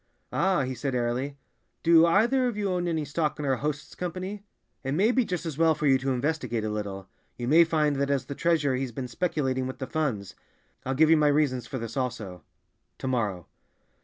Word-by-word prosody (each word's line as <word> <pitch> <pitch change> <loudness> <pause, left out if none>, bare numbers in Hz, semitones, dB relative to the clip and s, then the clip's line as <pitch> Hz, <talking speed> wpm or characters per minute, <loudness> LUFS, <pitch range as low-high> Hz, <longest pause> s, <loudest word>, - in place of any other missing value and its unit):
"Ah," 190 -7 +2
he 130 0 -3
said 130 +1 -3
airily, 125 +4 -1 0.5
"do 165 0 +6
either 235 +9 +3
of 235 -4 -3
you 200 -2 0
own 175 -1 -1
any 160 -3 -1
stock 150 +1 -1
in 150 - -4
our 135 -2 +1
host's 145 +1 -4
Company? 185 +3 -5 0.4
It 135 0 -2
may 200 +9 +3
be 255 0 +3
just 180 -5 -3
as 160 -2 -5
well 165 -1 +4
for 150 - -3
you 135 -2 +5
to 135 +1 -2
investigate 130 -3 -1
a 110 - -2
little; 100 -2 -5 0.3
you 120 - -4
may 160 +5 +7
find 155 -3 +1
that 140 0 0
as 135 -3 0
the 140 - -5
treasurer 150 -4 +1
he's 130 -1 -2
been 125 +2 -5
speculating 130 -3 -1
with 130 - -6
the 130 - -4
funds. 130 - -2 0.5
I'll 135 - 0
give 155 +3 +5
you 165 - +7
my 150 -1 +4
reasons 145 -4 +1
for 135 - -4
this 115 -2 -6
also—to 110 -1 -7
morrow." 105 -9 -1
145 Hz, 210 wpm, -27 LUFS, 130-165 Hz, 0.5 s, may